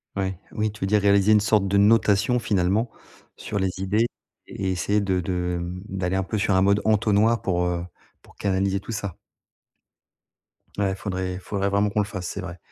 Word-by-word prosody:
Ouais, 95 -2 -2
oui, 110 0 -1
tu 105 - -15
veux - - +1
dire, 105 +1 +3
réaliser 100 +1 +4
une 105 - +6
sorte 105 -1 +2
de 100 - 0
notation, 105 +2 +4
finalement, 105 0 +1 0.4
sur - - -5
les 95 -1 +1
idées 100 +4 +1 0.4
et 95 - -4
essayer 100 +3 +1
de 95 -2 0
de, 90 0 -2
hem, 85 +1 -5
d'aller 95 -1 -2
un 95 - +1
peu 110 - -3
sur 100 0 +1
un 95 - +4
mode 100 +1 +3
entonnoir 110 +1 +3
pour, 90 -2 0
heu, 90 -1 -1 0.4
pour - - -20
canaliser 95 0 0
tout 100 - -8
ça. 100 -5 -4 1.6
Ouais, 95 -1 +1
faudrait 95 -1 -3
faudrait 100 +1 -2
vraiment 100 +1 +2
qu'on 105 - 0
le 105 - +2
fasse, 95 -3 -6
c'est 100 - -5
vrai. 90 -2 -7
100 Hz, 195 wpm, -24 LUFS, 95-105 Hz, 1.6 s, une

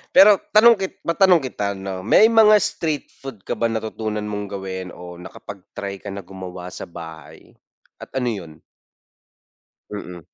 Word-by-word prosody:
Pero 195 +1 +8 0.2
tanong 235 +2 +8
kit 190 -1 -3
matanong 180 -1 +4
kita 100 -6 -2
no, 95 -1 -5
may 215 - +6
mga 215 -1 +7
street 155 -5 -2
food 130 -8 -9
ka - - -4
ba 115 - +1
natutunan 110 -1 -3
mong 105 -1 -4
gawin 95 -2 -5
o 90 0 -10
nakapag-try 100 +1 -8
ka - - -11
na 100 -1 -7
gumawa 90 -1 -8
sa - - -8
bahay? 80 -2 -11 0.5
At - - -11
ano 125 -2 0
yun? 80 -7 -8 1.3
Mm. 90 -4 -7
100 Hz, 150 wpm, -21 LUFS, 95-140 Hz, 1.3 s, Pero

